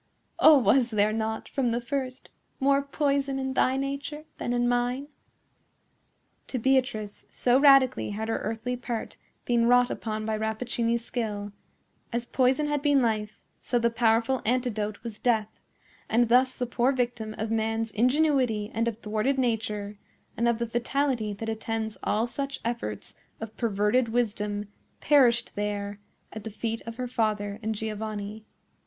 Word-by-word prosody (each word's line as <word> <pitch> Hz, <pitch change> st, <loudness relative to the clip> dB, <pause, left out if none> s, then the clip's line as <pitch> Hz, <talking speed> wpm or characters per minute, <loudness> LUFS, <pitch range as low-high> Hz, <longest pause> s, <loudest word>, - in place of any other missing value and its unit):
Oh, 310 Hz, -, +8 dB
was 255 Hz, -1 st, +3 dB
there 215 Hz, -1 st, +2 dB
not, 220 Hz, 0 st, -2 dB
from 260 Hz, -3 st, 0 dB
the 235 Hz, +1 st, 0 dB
first, 255 Hz, +1 st, -4 dB, 0.3 s
more 275 Hz, +1 st, +3 dB
poison 280 Hz, -1 st, 0 dB
in 265 Hz, 0 st, -2 dB
thy 260 Hz, 0 st, +2 dB
nature 280 Hz, +2 st, -4 dB
than -, -, -2 dB
in 245 Hz, 0 st, +1 dB
mine?" 245 Hz, +3 st, 0 dB, 1.4 s
To 260 Hz, -, -3 dB
Beatrice,—so 245 Hz, -1 st, +1 dB
radically 275 Hz, -3 st, +5 dB
had 215 Hz, +2 st, -4 dB
her 225 Hz, -, -1 dB
earthly 225 Hz, +3 st, -3 dB
part 240 Hz, -2 st, -5 dB, 0.3 s
been 235 Hz, -1 st, +2 dB
wrought 245 Hz, 0 st, +5 dB
upon 215 Hz, -1 st, -3 dB
by 220 Hz, 0 st, 0 dB
Rappaccini's 230 Hz, +1 st, -1 dB
skill,—as 215 Hz, +1 st, -6 dB
poison 260 Hz, +4 st, +2 dB
had 295 Hz, -1 st, 0 dB
been 290 Hz, -1 st, +4 dB
life, 215 Hz, -2 st, -2 dB, 0.2 s
so 245 Hz, -, 0 dB
the 235 Hz, 0 st, +2 dB
powerful 230 Hz, +2 st, +2 dB
antidote 220 Hz, -4 st, -1 dB
was 225 Hz, -3 st, -7 dB
death; 220 Hz, -3 st, 0 dB, 0.5 s
and 235 Hz, +1 st, +3 dB
thus 255 Hz, +2 st, +4 dB
the 250 Hz, -, -2 dB
poor 245 Hz, +2 st, +1 dB
victim 240 Hz, -4 st, -2 dB
of 220 Hz, +1 st, -3 dB
man's 225 Hz, 0 st, 0 dB
ingenuity 250 Hz, -3 st, +2 dB
and 230 Hz, +1 st, 0 dB
of 230 Hz, -2 st, -2 dB
thwarted 215 Hz, +6 st, 0 dB
nature, 215 Hz, -4 st, -1 dB, 0.4 s
and 235 Hz, -, +1 dB
of 235 Hz, -1 st, +2 dB
the 235 Hz, -, -1 dB
fatality 240 Hz, -1 st, 0 dB
that 225 Hz, +3 st, -6 dB
attends 220 Hz, 0 st, -3 dB
all 220 Hz, +2 st, +1 dB
such 275 Hz, +3 st, -4 dB
efforts 230 Hz, -, -3 dB, 0.3 s
of 220 Hz, -1 st, -7 dB
perverted 225 Hz, +2 st, +1 dB
wisdom, 210 Hz, -3 st, -1 dB, 0.3 s
perished 245 Hz, -5 st, +3 dB
there, 205 Hz, 0 st, -3 dB, 0.3 s
at 220 Hz, -, -7 dB
the 220 Hz, -, -5 dB
feet 225 Hz, +1 st, -3 dB
of 230 Hz, -, -5 dB
her 250 Hz, -1 st, -3 dB
father 215 Hz, -4 st, -1 dB
and 220 Hz, 0 st, -2 dB
Giovanni. 215 Hz, 0 st, -5 dB
235 Hz, 150 wpm, -27 LUFS, 215-255 Hz, 1.4 s, Oh